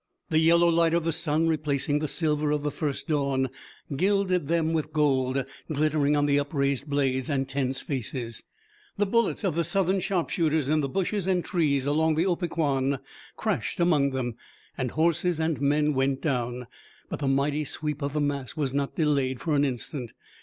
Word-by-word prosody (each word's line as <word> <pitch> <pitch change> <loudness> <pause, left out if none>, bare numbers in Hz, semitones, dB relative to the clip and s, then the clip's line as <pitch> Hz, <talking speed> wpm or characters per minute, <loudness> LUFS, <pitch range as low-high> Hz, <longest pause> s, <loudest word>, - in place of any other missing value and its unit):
The 155 - +4
yellow 170 +2 +5
light 165 0 +3
of 170 - +1
the 165 0 0
sun, 160 0 +1
replacing 145 -2 0
the 155 - -2
silver 150 0 0
of 150 -1 0
the 145 - -1
first 145 0 -3
dawn, 140 -4 +1 0.5
gilded 185 -1 +1
them 165 0 +1
with 155 -1 -1
gold, 135 -3 +1 0.3
glittering 150 -1 +2
on 145 - +2
the 145 0 +3
upraised 140 -1 -1
blades 135 -2 0
and 135 -2 0
tense 135 -1 -1
faces. 120 -3 -4 0.6
The 205 - +2
bullets 230 +2 +1
of 190 -5 +1
the 170 +2 +1
Southern 190 +2 +1
sharpshooters, 165 -6 0
in 155 0 +3
the 140 - -2
bushes 195 +4 -1
and 180 -2 +1
trees 145 -7 +1
along 155 +2 +2
the 165 +3 +2
Opequan, 155 -7 0 0.4
crashed - - -2
among 155 -5 +3
them, 125 -3 -3 0.4
and 130 -2 -2
horses 170 +3 +1
and 160 -3 0
men 150 +1 +2
went 135 0 +1
down, 125 -4 -2 0.4
but - - -5
the 140 - -1
mighty 140 +3 +1
sweep 150 +1 -3
of 140 0 -2
the 150 - 0
mass 140 -2 -2
was 140 -4 -1
not 140 0 -1
delayed 140 -5 +1
for 160 +3 -1
an 145 - +3
instant. 125 -2 -3
150 Hz, 180 wpm, -27 LUFS, 140-165 Hz, 0.6 s, yellow